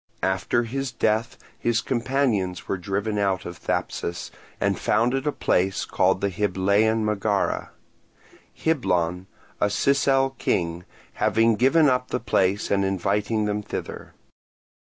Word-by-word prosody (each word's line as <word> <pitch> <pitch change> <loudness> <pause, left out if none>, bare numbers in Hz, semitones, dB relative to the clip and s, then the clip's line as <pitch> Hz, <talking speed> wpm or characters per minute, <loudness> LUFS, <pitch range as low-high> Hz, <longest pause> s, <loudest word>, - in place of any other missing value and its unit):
After 95 +5 +1
his 135 +3 -3
death 115 -1 0 0.2
his 120 -1 +1
companions 120 -8 -1
were 95 - -2
driven 100 +3 -2
out 95 -2 0
of 85 -1 -7
Thapsus, 85 +1 -3 0.3
and - - 0
founded 130 +5 +1
a - - +3
place 95 -7 0
called - - +1
the 100 - 0
Hyblaean 105 +3 +1
Megara; 105 -1 0 0.8
Hyblon, 90 - 0 0.3
a 105 - +2
Sicel 135 +4 +2
king, 85 0 -1 0.3
having 115 0 +2
given 140 +7 +4
up 125 -1 +1
the - - -2
place 100 -3 0
and 100 -1 +2
inviting 100 +3 0
them 105 0 -1
thither. - - -7
105 Hz, 125 wpm, -24 LUFS, 95-120 Hz, 0.8 s, given